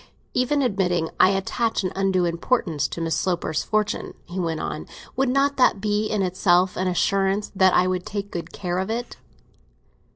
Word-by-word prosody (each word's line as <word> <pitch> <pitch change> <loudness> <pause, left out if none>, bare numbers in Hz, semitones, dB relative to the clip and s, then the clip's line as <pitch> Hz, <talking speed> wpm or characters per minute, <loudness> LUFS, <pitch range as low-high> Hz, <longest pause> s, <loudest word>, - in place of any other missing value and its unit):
"Even 275 +3 +1
admitting 180 -8 0
I 185 - +7
attach 205 +3 0
an 185 - -1
undue 190 -2 +2
importance 170 - 0
to - - -7
Miss 165 0 0
Sloper's 175 -4 -1
fortune," 215 -1 -1
he 180 +2 -6
went 165 -3 -1
on, - - -4 0.3
"would 265 -1 +1
not 275 +2 +2
that 250 -5 +4
be 210 +1 0
in 210 -2 0
itself 180 0 +2
an 185 - -1
assurance 195 +3 +1
that 190 -1 +4
I - - +5
should 185 -1 -1
take 200 0 -5
much 170 - -5
care 180 -1 -3
of 190 +2 -2
it?" 235 +2 -4
190 Hz, 175 wpm, -23 LUFS, 180-215 Hz, 0.3 s, I